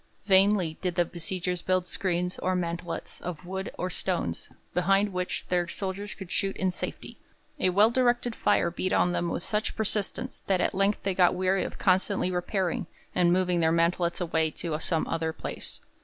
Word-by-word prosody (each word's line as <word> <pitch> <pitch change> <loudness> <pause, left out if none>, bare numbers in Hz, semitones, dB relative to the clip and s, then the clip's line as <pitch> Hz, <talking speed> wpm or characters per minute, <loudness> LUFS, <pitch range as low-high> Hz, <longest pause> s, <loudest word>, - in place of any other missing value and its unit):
Vainly 190 -4 +4
did 180 -2 -1
the 175 -1 +3
besiegers 180 +1 -3
build 185 -1 +1
screens 180 -2 -1
or 185 0 0
'mantelets' 170 -1 -4
of 175 -1 -6
wood 190 +1 -4
or 180 0 -2
stones, 170 - -2 0.2
behind 195 +3 +2
which 180 0 -2
their 175 -1 +1
soldiers 195 +3 -4
could 190 -4 -9
shoot 195 -1 -1
in 190 -1 +1
safety; - - -6 0.4
a 185 - +3
well 205 +5 +5
directed 240 -1 +2
fire 170 - +2
beat 185 +2 -1
on 180 - +3
them 175 -1 -1
with 170 - -2
such 215 0 -1
persistence 220 +4 0
that 190 -2 +2
at - - +1
length 195 +2 +1
they 195 - 0
got 180 -1 +4
weary 185 +1 +1
of - - -6
constantly 190 0 +2
repairing, 180 0 -1 0.3
and 175 -1 +3
moved 180 0 +2
their 160 0 +3
mantelets 170 +1 +1
away 160 -2 +1
to 155 0 -4
some 160 0 +1
other 160 -1 -1
place. - - -5
180 Hz, 180 wpm, -28 LUFS, 175-195 Hz, 0.4 s, well